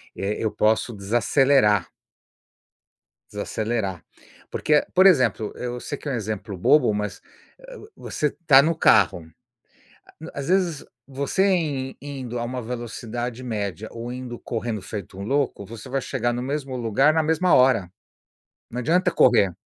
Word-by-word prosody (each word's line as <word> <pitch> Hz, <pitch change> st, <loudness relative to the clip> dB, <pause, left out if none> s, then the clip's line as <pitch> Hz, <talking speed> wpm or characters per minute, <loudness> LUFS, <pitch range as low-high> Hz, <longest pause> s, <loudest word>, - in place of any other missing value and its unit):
eh, 100 Hz, +2 st, -2 dB
eu 110 Hz, -, -1 dB
posso 110 Hz, +3 st, +1 dB
desacelerar. 105 Hz, -, +3 dB, 1.5 s
Desacelerar, 105 Hz, -3 st, -3 dB, 0.5 s
porque, 150 Hz, -1 st, +2 dB
por 185 Hz, -, +6 dB
exemplo, 125 Hz, -, +3 dB
eu 125 Hz, 0 st, -5 dB
sei 145 Hz, -, -5 dB
que -, -, -8 dB
é 140 Hz, -, -1 dB
um -, -, -2 dB
exemplo 110 Hz, -3 st, -4 dB
bobo, 110 Hz, +4 st, +4 dB
mas, 105 Hz, 0 st, -4 dB, 0.4 s
eh, -, -, -12 dB, 0.2 s
você 150 Hz, -, -3 dB
está 145 Hz, -4 st, +5 dB
no 165 Hz, +2 st, +1 dB
carro, 100 Hz, -, +3 dB, 1.1 s
a -, -, -7 dB
as 140 Hz, -, -5 dB
vezes 180 Hz, -5 st, +1 dB, 0.2 s
você 140 Hz, +8 st, 0 dB
in 140 Hz, -6 st, -2 dB
indo 130 Hz, -4 st, -6 dB
a -, -, -2 dB
uma 125 Hz, +1 st, -4 dB
velocidade 120 Hz, +1 st, -5 dB
média 105 Hz, -3 st, -4 dB
ou 120 Hz, +1 st, -6 dB
indo 125 Hz, -1 st, -7 dB
correndo 115 Hz, -2 st, -4 dB
feito 100 Hz, -2 st, -8 dB
um -, -, -5 dB
louco, 135 Hz, -3 st, -1 dB
você 115 Hz, +3 st, -10 dB
vai 135 Hz, +1 st, -1 dB
chegar 120 Hz, -2 st, -1 dB
no 120 Hz, +1 st, -3 dB
mesmo 135 Hz, 0 st, -3 dB
lugar, 125 Hz, +6 st, +3 dB
na 160 Hz, -, +3 dB
mesma 160 Hz, +3 st, +2 dB
hora. 120 Hz, -8 st, +4 dB, 0.8 s
Não 125 Hz, -, -4 dB
adianta 180 Hz, +8 st, +2 dB
correr, 115 Hz, -, +4 dB
125 Hz, 150 wpm, -23 LUFS, 110-140 Hz, 1.5 s, por